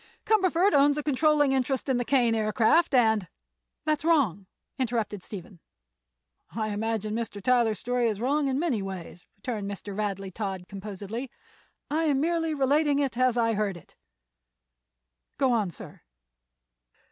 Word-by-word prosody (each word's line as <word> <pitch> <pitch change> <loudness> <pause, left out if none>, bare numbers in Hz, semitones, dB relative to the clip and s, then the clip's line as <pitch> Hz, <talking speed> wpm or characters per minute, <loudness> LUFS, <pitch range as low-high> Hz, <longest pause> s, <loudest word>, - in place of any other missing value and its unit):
Cumberford 380 -3 +3
owns 285 +1 +4
a 300 - -2
controlling 295 0 +3
interest 265 +1 0
in 265 -2 +2
the 245 - 0
Kane 245 -3 +2
Aircraft, 225 +8 +3
and—" 220 -6 +3 0.6
"That's 305 -1 0
wrong," 245 - +2 0.3
interrupted 230 -5 -1
Stephen. 180 -2 -9 1.0
"I 215 -1 -1
imagine 215 0 -2
Mr. 225 -2 -4
Tyler's 235 0 +2
story 245 -1 0
is 210 -3 -2
wrong 280 +4 +1
in 265 -1 0
many 285 -9 0
ways," 185 -3 -8
returned 205 -1 -4
Mr. 200 0 -6
Radley 195 -2 -3
Todd, 190 -2 -4
composedly. 205 +5 -6 0.6
"I 320 +2 +1
am 285 -3 +2
merely 325 0 0
relating 285 +1 +2
it 275 -4 0
as 255 -1 +2
I 230 -1 +2
heard 205 -3 -1
it." 170 - -18 1.4
"Go 265 -2 +2
on, 215 -5 +1
sir." 170 - -11
235 Hz, 145 wpm, -27 LUFS, 205-285 Hz, 1.4 s, owns